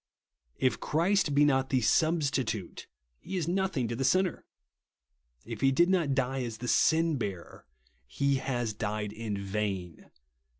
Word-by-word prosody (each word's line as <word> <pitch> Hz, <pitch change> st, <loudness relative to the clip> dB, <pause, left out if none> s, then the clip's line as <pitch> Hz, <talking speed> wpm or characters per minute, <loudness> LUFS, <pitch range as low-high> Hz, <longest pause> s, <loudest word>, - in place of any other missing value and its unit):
If 130 Hz, -, +1 dB
Christ 170 Hz, -1 st, +1 dB
be 145 Hz, +1 st, +5 dB
not 135 Hz, -2 st, +2 dB
the 130 Hz, -, +2 dB
Substitute, 135 Hz, -, 0 dB, 0.3 s
he 190 Hz, -, -5 dB
is 165 Hz, -3 st, -2 dB
nothing 180 Hz, -8 st, 0 dB
to 115 Hz, -, -3 dB
the 135 Hz, -, -2 dB
sinner. 185 Hz, +5 st, +1 dB, 1.0 s
If -, -, -7 dB
he 135 Hz, -, +4 dB
did 170 Hz, +6 st, +3 dB
not 165 Hz, -8 st, +1 dB
die 135 Hz, 0 st, -1 dB
as 115 Hz, -3 st, -5 dB
the 125 Hz, -, -7 dB
Sinheaver, 140 Hz, -, 0 dB, 0.4 s
he 140 Hz, -, 0 dB
has 120 Hz, -4 st, -2 dB
died 105 Hz, 0 st, -3 dB
in 110 Hz, -2 st, -4 dB
vain. 100 Hz, -3 st, -4 dB
135 Hz, 140 wpm, -29 LUFS, 110-160 Hz, 1.0 s, be